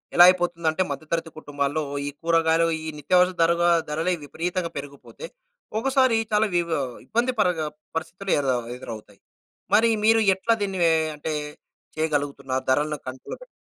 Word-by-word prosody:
ఎలా 175 - +9
అయిపోతుందంటే 175 -2 0
మధ్య 155 +3 -5
తరగతి 165 -1 -1
కుటుంబాల్లో 145 0 -2 0.3
ఈ - - -1
కూరగాయలు, 165 0 +3 0.2
ఈ - - -5
నిత్యావసర 180 +5 +3
ధరవ 170 +1 +3 0.3
ధరలు 160 +4 0
విపరీతంగా 170 +3 -3
పెరిగిపోతే 140 - -9 0.5
ఒకసారి 260 -2 +3
చాలా 210 +1 +3
వివ 170 -1 +1 0.4
ఇబ్బంది 240 +3 0
పరగ 180 -4 +2 0.4
పరిస్థితులు 175 +4 -5
ఎర 140 - -2 0.3
ఎదురవుతాయి. 115 -3 -10 0.6
మరి 230 +1 +5 0.2
మీరు 225 0 +5 0.2
ఎట్లా 230 +4 +1
దీన్ని 195 -2 -2
ఎ - - +4 0.2
అంటే 155 +1 -4 0.6
చేయగలుగుతున్నారు? 145 -4 -1
ధరలను 150 +3 +1
కంట్రోల్‌లో 130 0 -7
పెట్ - - -11
165 Hz, 135 wpm, -24 LUFS, 150-185 Hz, 0.6 s, ఎలా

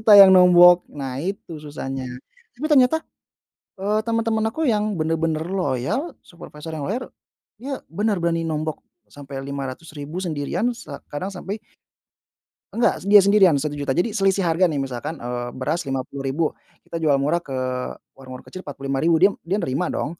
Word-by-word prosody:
Kita 220 -1 +5
yang 195 -1 +11
nombok, 180 -1 +7
nah 135 -3 -5
itu 180 -3 -5
susahnya. 135 -3 -5 0.5
Tapi 300 +5 -3
ternyata, 285 +1 +4 0.8
eee, 210 +2 +1
temen-temen 225 -1 0
aku 320 -1 -1
yang 210 -1 +1
bener-bener 160 0 0
loyal, 190 - -2
supervisor 165 -2 -11
yang 145 -3 -4
loyar, 245 +6 -3 0.5
dia 270 +1 -5
bener 205 +3 0
berani 165 -1 0
nombok 155 -1 -3 0.3
sampai 140 -1 -8
Rp500.000 145 +4 -6
sendirian, 165 - -1
se 145 - -11 0.2
kadang 180 +7 -4
sampai 195 +3 -5 1.2
Enggak, 235 - +2
dia 205 -1 +8
sendirian 195 -5 +5
Rp1.000.000. 145 -1 -2
Jadi 210 +6 +1
selisih 195 -2 +2
harga 170 +2 +3
nih, 155 - -3
misalkan, 135 +3 -3
eee, 120 0 -3
beras 150 +4 -2
Rp50.000 135 +3 -2 0.4
kita 165 - -6
jual 150 -3 +3
murah 145 +5 +1
ke 135 -6 -7 0.6
warung-warung 130 -1 -11
kecil 185 - -10
Rp45.000, 140 +1 0
dia 200 - +7 0.2
dia 190 - +1
nerima 140 +5 -1
dong. 165 +4 -3
165 Hz, 150 wpm, -22 LUFS, 140-200 Hz, 1.2 s, yang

